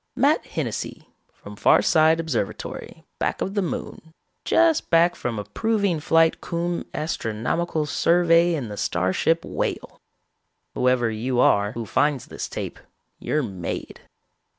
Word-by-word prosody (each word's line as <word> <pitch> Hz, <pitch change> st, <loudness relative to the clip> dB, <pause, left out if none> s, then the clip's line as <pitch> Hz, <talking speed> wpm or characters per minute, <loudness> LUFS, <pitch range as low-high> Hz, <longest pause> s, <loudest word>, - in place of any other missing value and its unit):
Matt -, -, +3 dB
Hennessy, -, -, -5 dB, 0.2 s
from 105 Hz, -, -12 dB
Farside 160 Hz, -, +4 dB
Observatory, 155 Hz, -11 st, -4 dB, 0.2 s
back -, -, -1 dB
of 195 Hz, -, -2 dB
the 205 Hz, -, +1 dB
Moon, 160 Hz, -2 st, -6 dB, 0.3 s
just 330 Hz, -2 st, +3 dB
back 170 Hz, +1 st, +4 dB
from 120 Hz, -2 st, -4 dB
a 105 Hz, -, -3 dB
proving 200 Hz, -, 0 dB
flight 165 Hz, +1 st, +3 dB
cum 170 Hz, 0 st, -3 dB
astronomical 150 Hz, +3 st, -2 dB
survey 170 Hz, +2 st, +3 dB
in 135 Hz, -7 st, -4 dB
the 105 Hz, -, -7 dB
starship 95 Hz, -, 0 dB
Whale. -, -, -4 dB, 0.7 s
Whoever 125 Hz, -2 st, +2 dB
you 120 Hz, +3 st, -2 dB
are 100 Hz, -3 st, +3 dB
who 115 Hz, -1 st, -5 dB
finds 140 Hz, +4 st, +1 dB
this -, -, -6 dB
tape, -, -, -6 dB, 0.4 s
you're 150 Hz, -1 st, -1 dB
made. 95 Hz, -7 st, -5 dB
155 Hz, 130 wpm, -23 LUFS, 115-170 Hz, 0.7 s, Farside